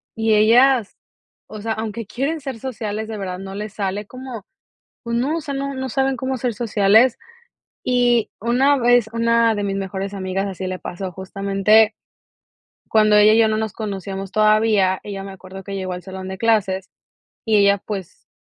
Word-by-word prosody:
y 225 0 +1
ellas, 235 +2 +4 0.5
o 215 -1 -9
sea, 225 +1 -2
aunque 220 -1 -5
quieren 280 +8 -2
ser 270 -4 -5
sociales, 220 -3 -4
de 220 -1 -5
verdad 185 -2 -4
no 195 0 -8
les 210 +1 -6
sale 200 0 -3
como, 255 -5 -9 0.6
pues, 235 0 -3
no, 275 +7 0
o - - -4
sea, 285 -2 -5
no 275 0 -3
no 265 0 -4
saben 265 +2 0
cómo 260 +2 -2
ser 250 -1 -2
sociales. 220 +2 +3 0.7
Y 245 -2 +2
una 255 +6 +3
vez 245 -2 +3
una 230 -1 +3
de 205 - -2
mis 195 -1 -2
mejores 195 +1 -4
amigas 190 0 -2
así 190 -1 -5
le 185 0 -4
pasó, 185 +1 -6
justamente 195 +4 +2 1.0
cuando 215 -1 +4
ella 210 +1 +7
y 225 - +4
yo, 225 - +5
no 215 0 0
nos 220 -2 -3
conocíamos 195 -2 -5
todavía. 215 -3 +3
Ella 195 -1 -6
me 195 - -8
acuerdo 190 0 -11
que 200 - -7
llegó 185 -1 -3
al 180 0 -7
salón 190 0 -7
de 190 0 -6
clases 195 -4 0 0.5
y 220 - +2
ella, 200 0 +4
pues, 195 -5 -7
215 Hz, 185 wpm, -21 LUFS, 195-235 Hz, 1.0 s, ella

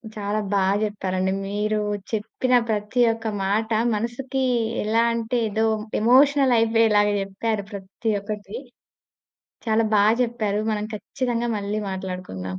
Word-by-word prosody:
చాలా 210 0 -2
బాగా 195 0 +2
చెప్పారండి. 190 -3 -1 0.2
మీరు 210 +2 -1 0.3
చెప్పిన 230 +4 -1 0.2
ప్రతి 210 +3 0
ఒక్క 225 0 -5 0.2
మాట 210 +3 0 0.3
మనసుకి 250 +5 -3 0.4
ఎలా 225 +2 +2
అంటే, 230 +1 -1
ఏదో 220 +2 0 0.3
ఎమోషనల్ 265 +3 +5
అయిపోయేలాగా 225 -2 +3
చెప్పారు 200 +2 -3
ప్రతి 200 +3 -4
ఒక్కటి. 205 0 -6 1.1
చాలా 225 0 +2
బాగా 210 +2 +5
చెప్పారు. 215 -3 -2
మనం 210 -1 -2
ఖచ్చితంగా 240 +2 -2
మళ్ళీ 205 +1 -2
మాట్లాడుకుందాం. 180 - -5
215 Hz, 115 wpm, -23 LUFS, 200-230 Hz, 1.1 s, ఎమోషనల్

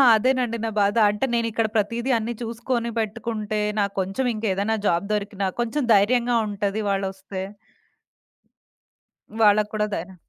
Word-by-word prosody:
అదేనండి. 245 0 +1
నా - - -1
బాధ 205 +2 +2
అంటే 210 +5 -1
నేనిక్కడ 230 -1 0
ప్రతీదీ 230 +5 0
అన్నీ 230 +1 -3
చూసుకొని 235 +1 -2
పెట్టుకుంటే 215 -1 -2 0.2
నాకు 200 -1 0
కొంచెం 195 +8 -2
ఇంకేదైనా 215 0 0
జాబ్ 170 +3 +1
దొరికినా 200 -1 -2
కొంచెం 240 +5 -1
ధైర్యంగా 235 +4 +3
ఉంటది 205 +1 -2
వాళ్ళొస్తే. 195 -1 -3 2.0
వాళ్ళకి 210 0 +5
కూడా 210 0 +1
ధైరం 185 +3 -6
215 Hz, 125 wpm, -24 LUFS, 200-235 Hz, 2.0 s, వాళ్ళకి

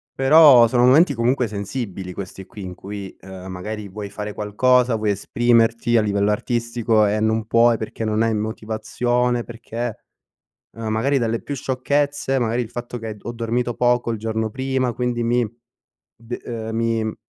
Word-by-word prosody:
Però 135 -3 +7
sono 120 +1 +3
momenti 140 +4 +5
comunque 120 +1 +1
sensibili 100 -2 -5
questi 95 0 -8
qui 105 - -11
in 90 -1 -7
cui, 100 0 -8
ehm, 95 -1 -10
magari 105 +3 -6
vuoi 100 +1 -7
fare 105 +1 -5
qualcosa, 125 +4 +2
vuoi 110 -1 0
esprimerti 115 +3 +2
a - - +5
livello 100 0 +1
artistico 115 0 +1
e 105 +1 0
non 110 0 0
puoi 115 0 +4
perché 110 +1 -5
non 110 0 0
hai 115 -1 +2
motivazione, 120 +3 -1
perché 120 0 -6 0.8
magari 115 +5 0
dalle 115 -2 -1
più 145 - -5
sciocchezze, 135 +1 -1
magari 120 0 0
il 115 - -5
fatto 120 0 -6
che 110 -2 -6
ho 120 - -6
dormito 120 +1 -2
poco 120 0 +1
il 115 - -3
giorno 110 0 -2
prima, 130 0 -1
quindi 120 -1 -1
mi 120 +1 +2 0.7
de, 115 +1 -7
ehm, 110 -2 -5
mi, 115 -1 0
mhmm, 110 - -4
115 Hz, 165 wpm, -21 LUFS, 110-120 Hz, 0.8 s, Però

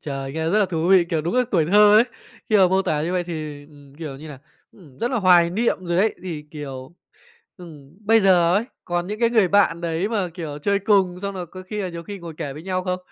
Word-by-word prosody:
Trời, 135 -2 -5
nghe 160 +1 -2
rất 210 - +3
là 210 - +4
thú 165 -1 -2
vị, 185 -2 +6
kiểu, 170 -2 -2
đúng 170 +6 -3
là 250 - +4
tuổi 165 -5 +2
thơ 210 +3 +6
ấy! 225 - +6 0.4
Khi 215 - +4
mà 190 -2 +5
mô 190 +1 +2
tả 150 -4 -1
như 170 +3 -2
vậy 180 -1 -1
thì, 155 -4 -6
ừm, 145 -2 -18
kiểu 150 -5 -6
như 155 +3 -11
là, 140 - -10 0.3
ừm, 150 -10 -18
rất 240 +2 -1
là 250 - 0
hoài 175 -4 +5
niệm 225 +6 0
rồi 170 0 -1
đấy. 210 +3 +2
Thì, 165 -5 -6
kiểu, 135 -2 -8 0.6
ừm, 160 -4 -14
bây 225 +1 +5
giờ 180 -3 +4
ấy, 210 +4 +1 0.2
còn 175 0 -2
những 210 +3 -6
cái 235 - +3
người 220 -6 +3
bạn 195 -3 +3
đấy 170 +3 -2
mà, 205 -5 -1
kiểu, 155 -5 -6
chơi 200 +6 0
cùng, 190 -3 +1
xong 200 -1 -4
rồi 180 -2 -5
có 185 +3 -11
khi 210 +2 -5
là 185 - -3
nhiều 170 -1 -7
khi 200 +2 -8
ngồi 170 -3 -9
kể 140 - -4
với 150 - -10
nhau 185 0 -2
không? 180 -1 -2
175 Hz, 265 wpm, -22 LUFS, 155-200 Hz, 0.6 s, vị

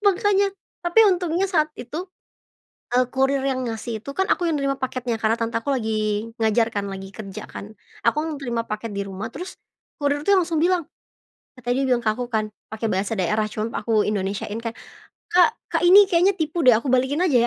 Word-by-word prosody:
makannya, 405 0 +3 0.3
tapi 350 +6 +5
untungnya 360 -2 +2
saat 330 -6 +2
itu, 315 +10 -6 0.9
eee, 250 0 +4
kurir 270 0 +1
yang 260 -1 -1
ngasih 225 0 -4
itu 280 - -9
kan 380 +4 0
aku 350 - +2
yang 325 -2 +1
nerima 275 -1 0
paketnya 250 -3 -2
karena 220 0 +1
tante 230 0 0
aku 275 +5 -1
lagi 215 -2 -1
ngajar 225 +1 +2
kan, 205 -3 -3
lagi 195 -1 -6
kerja 195 -1 -8
kan. 210 +2 -9 0.3
Aku 230 +6 +3
yang 315 -3 -4
nerima 240 -4 -2
paket 215 0 -4
di 200 - -2
rumah 200 +4 -6
terus, 360 +6 -7 0.4
kurir 290 0 0
tuh 395 +5 +4
langsung 330 -3 +1
bilang 350 -1 +2 0.7
tadi 245 +2 0
dia - - +1
bilang 245 - +4
ke 215 - +4
aku 245 +2 -5
kan, 215 -1 0 0.2
pakai 220 +1 -2
bahasa 195 +3 -1
daerah 215 +4 +1
cuma 220 +2 -3
aku 220 -3 +2
Indonesia-in 205 +2 -2
kan, 230 - -2 0.6
"Kak 360 +5 +6 0.2
Kak, - - 0
ini 390 +3 +8
kayaknya 370 +1 +4
tipu 325 +1 -1
deh 255 - +8
aku 235 - -7
balikin 260 +4 +1
aja 290 - +1
250 Hz, 195 wpm, -23 LUFS, 220-330 Hz, 0.9 s, ini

